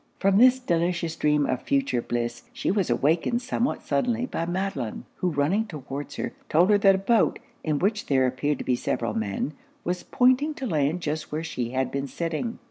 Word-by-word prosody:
From 195 +1 +3
this 255 +1 +7
delicious 170 -7 0
dream 150 -2 +2
of 130 - -1
future 275 - +1
bliss, 120 0 -3
she - - -1
was 195 -5 0
awakened 160 - +1
somewhat 255 +1 -1
suddenly 230 - 0
by 165 -9 -3
Madelon; 175 - -3
who 185 - 0
running 170 +9 +1
towards 145 -5 -6
her, - - -4 0.2
told 175 +6 +4
her 205 - +5
that 195 -1 +6
a 190 +1 -5
boat, 230 0 +3 0.3
in 155 -2 0
which 210 +6 0
there 130 -2 +3
appeared 130 +3 0
to - - -5
be 125 - +2
several 115 -2 -2
men, 110 +7 -2 0.3
was 180 +1 -2
pointing 260 +5 +2
to 270 - -5
land 155 - 0
just 155 0 -3
where 155 +2 -2
she 125 -7 -3
had 130 0 -1
been 140 0 -2
sitting. 170 - -3
165 Hz, 195 wpm, -26 LUFS, 140-205 Hz, 0.3 s, this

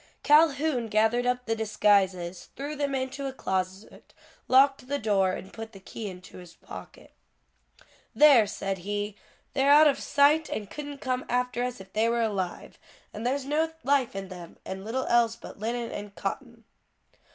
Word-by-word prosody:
Calhoun 295 -4 +4
gathered 220 +3 +2
up 250 0 0
the 225 - 0
disguises, 195 -5 +1
threw 290 +2 -5
them 285 -1 -1
into 265 +1 -3
a - - -3
closet, 190 -4 -4 0.3
locked 270 0 +4
the 285 +1 -1
door 195 -5 +1
and 190 - -8
put 225 0 -8
the 195 - -11
key 205 +2 -7
into 185 0 -11
his 175 -2 -13
pocket. - - -12 1.0
"There!" 275 -8 +7
said 195 -1 -3
he, 205 +2 -3 0.4
"they're 275 0 +2
out 300 +2 +8
of 290 -2 +3
sight 295 +3 +3
and 210 -3 -5
couldn't 290 -1 -7
come 255 -1 -1
after 250 0 0
us 250 0 -3
if 190 0 -13
they 220 +2 +2
were 235 0 +1
alive; 195 -5 -3 0.3
and 220 +3 -3
there's 270 +1 -1
no 315 +3 0
life 270 -5 +1
in 195 -1 -5
them; 175 -3 -10
and 190 0 -6
little 240 +5 -2
else 235 -1 +3
but - - -12
linen 235 +2 -3
and 205 -1 -7
cotton." 235 +3 -5
235 Hz, 170 wpm, -27 LUFS, 200-275 Hz, 1.0 s, out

